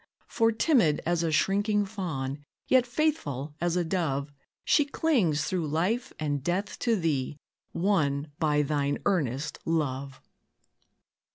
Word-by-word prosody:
For, 225 -1 +2
timid 225 - +3
as 170 0 +1
a 165 -1 0
shrinking 205 +5 +2
fawn, 150 -9 -4 0.2
Yet 255 -1 +4
faithful 155 - -1
as 175 0 +1
a 175 - +2
dove, 145 -5 -1 0.3
She 295 - +4
clings 240 - +1
through 175 -4 -1
life 185 - 0
and 145 -3 -2
death 185 +5 -2
to 230 -2 +2
thee, 150 -7 -1 0.3
Won 150 -6 0
by 150 -2 +2
thine 145 -1 0
earnest 150 - 0
love. 140 -4 -2
165 Hz, 125 wpm, -28 LUFS, 145-205 Hz, 0.3 s, Yet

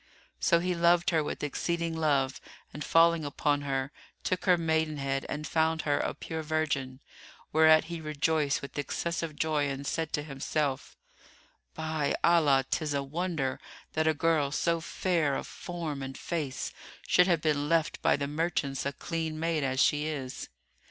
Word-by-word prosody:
So 170 - +4
he 180 +2 0
loved 170 +1 +3
her 160 -2 +2
with - - -5
exceeding 170 +3 -1
love 140 -4 +1 0.3
and 150 - -5
falling 165 -1 +4
upon 145 0 0
her, 135 -1 -2 0.3
took 185 -2 -1
her 180 -2 +5
maidenhead 155 -4 0
and 150 +1 -4
found 160 0 +1
her 145 -1 +1
a - - -2
pure 160 0 -5
virgin; 145 -4 -2 0.5
whereat 160 0 +6
he 165 0 -6
rejoiced 155 -1 0
with 140 - -6
excessive 165 +2 -3
joy 150 -2 0
and 140 0 -4
said 160 +1 -1
in 150 - -4
himself, 140 -1 -2 0.8
"By 155 -2 -1
Allah, 145 -6 +4
'tis 150 -3 -1
a 140 - 0
wonder 155 -2 -2 0.3
that 160 0 +1
a 160 - +3
girl 150 -2 +2
so 170 +3 +1
fair 165 -4 0
of - - -3
form 165 -5 -5
and 135 0 -6
face 150 -6 -3 0.3
should 180 0 +5
have 170 -4 +2
been 150 -2 +1
left 165 -2 +1
by - - +3
the 140 0 -2
merchants 145 -3 -1
a 140 - -3
clean 160 +1 -3
maid 165 -2 0
as 130 -1 -1
she 150 +2 +3
is!" 135 -5 -5
155 Hz, 165 wpm, -29 LUFS, 140-165 Hz, 0.8 s, whereat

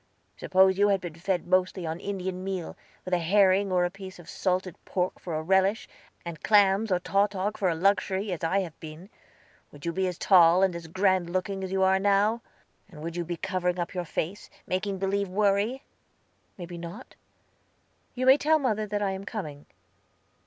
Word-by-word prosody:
"Suppose 190 0 +3
you 205 - +5
had 200 -1 +2
been 175 -3 -7
fed 175 +2 -2
mostly 185 0 +1
on 160 +1 -4
Indian 185 -2 -4
meal, 190 -3 -4 0.3
with 185 - -4
a 180 - +3
herring 195 +2 +3
or 180 -1 +2
a 175 - -2
piece 190 -1 -10
of 175 - -14
salted 185 -2 -2
pork 180 -1 -2
for 170 -3 -5
a 155 - -2
relish, 190 +4 +2 0.4
and 170 -2 -7
clams 205 0 +3
or 180 - +2
tautog 200 +2 0
for 190 -3 0
a 165 - 0
luxury, 195 +2 +1
as 175 - -5
I 190 +4 +2
have 170 -4 -8
been, 160 +6 -10 0.6
would 145 +2 -12
you 170 - -1
be 190 +1 0
as 180 -2 -4
tall 180 -1 +5
and 190 -2 +2
as 170 -1 -7
grand 185 0 +1
looking 190 +2 -2
as 190 - -5
you 190 0 +1
are 190 0 +4
now? 205 +3 +2 0.5
And 155 -5 -11
would 165 0 -5
you 175 - -2
be 170 0 -5
covering 180 0 -1
up 175 -1 -3
your 180 -2 -2
face, 170 +5 -4 0.2
making 190 +2 -2
believe 195 +1 -1
worry?" 205 +6 +1 0.7
"May 175 - -6
be 170 0 -9
not. 170 +9 -9 1.0
You 255 0 -1
may 265 +2 +7
tell 310 +2 +3
mother 215 -7 -1
that 205 0 -2
I 195 - 0
am 190 0 -5
coming." 155 -9 -7
190 Hz, 195 wpm, -27 LUFS, 175-200 Hz, 1.0 s, may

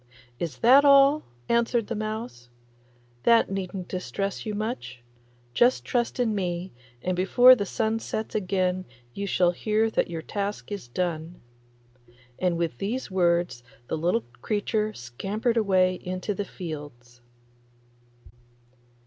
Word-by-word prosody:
'Is 170 -3 -4
that 260 +5 +6
all?' 280 +1 +6 0.3
answered 235 -1 +2
the 235 - -4
mouse; 215 - -5 0.7
'that 230 - +4
needn't 190 -1 -4
distress 195 +3 -4
you 210 - -2
much. 210 - -5 0.5
Just 240 - +3
trust 240 0 -1
in 235 -3 +2
me, 180 -2 -3 0.3
and 185 0 0
before 245 +8 +7
the 205 -6 -1
sun 225 0 0
sets 220 -1 -4
again 185 -2 0 0.3
you 200 +7 -4
shall 180 -2 +3
hear 215 +4 0
that - - 0
your 165 -2 -5
task 205 +2 -4
is 200 -11 -5
done.' 170 +4 -3 1.0
And 180 -2 +1
with 165 -7 -2
these 225 +2 -3
words 175 -7 +1 0.3
the - - 0
little 160 -7 0 0.2
creature 215 0 -1
scampered 205 - -3
away 185 -4 +2
into 185 +3 -3
the 200 +1 -3
fields. 145 -10 -9
195 Hz, 130 wpm, -26 LUFS, 175-220 Hz, 1.0 s, before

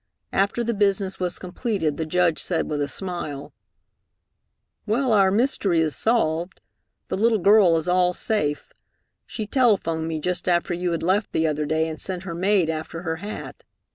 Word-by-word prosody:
After 200 +5 +1
the 235 0 -1
business 195 -2 0
was 180 -1 -2
completed 185 - -2
the 160 - -3
Judge 175 -1 +2
said 175 - -1
with 150 -1 -2
a 145 - 0
smile, 150 -5 -5 1.3
"Well, 240 +3 +1
our 195 -2 +5
mystery 200 -5 +1
is 155 -2 +1
solved. 180 -6 0 0.5
The - - -2
little 225 +2 +3
girl 195 -3 +5
is 160 - -3
all 180 0 +3
safe. 150 -7 -1 0.6
She 215 - -4
telephoned 200 - +1
me 160 -1 -3
just 180 +3 -2
after 175 0 +1
you 175 +1 -2
had 165 - -2
left 195 +4 +1
the 160 - +1
other 150 -1 -1
day, 160 +1 +1
and 160 -1 -6
sent 185 -1 -3
her 180 -3 -5
maid 185 0 +2
after 160 +1 -4
her 160 -2 -2
hat. 205 +5 -8
180 Hz, 170 wpm, -23 LUFS, 160-205 Hz, 1.3 s, our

